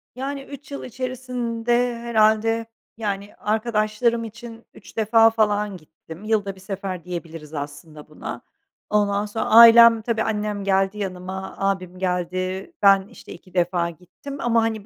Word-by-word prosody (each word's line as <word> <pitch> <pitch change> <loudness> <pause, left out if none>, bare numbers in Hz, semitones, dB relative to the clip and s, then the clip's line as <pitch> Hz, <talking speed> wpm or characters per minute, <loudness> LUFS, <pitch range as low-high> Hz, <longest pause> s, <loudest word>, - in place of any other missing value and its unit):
Yani, 275 +2 -4
3 280 +1 -12
yıl 280 - -6
içerisinde 245 -1 -2
herhâlde, 225 0 +2 0.3
yani, 200 -2 -4
arkadaşlarım 220 +1 0
için 230 +1 -10
3 - - -16
defa 225 +1 +5
falan 210 -3 0
gittim. 160 +3 -14
Yılda 205 -3 -1
1 190 - -16
sefer 190 -2 -5
diyebiliriz 165 -3 -7
aslında 145 +1 -8
buna. - - -7 0.5
Ondan 205 -1 +1
sonra 215 +1 -3
ailem 230 0 +8
tabii 225 0 -1
annem 210 -2 -2
geldi 195 +1 +1
yanıma, 190 -1 -5
ağabeyim 185 -2 -2
geldi. 185 - -2
Ben 195 -1 +5
işte 235 - -12
2 180 +2 -16
defa 175 -1 +1
gittim 180 - -10
ama, 230 -1 +2
hani, 220 -2 -2
210 Hz, 135 wpm, -23 LUFS, 185-230 Hz, 0.5 s, ailem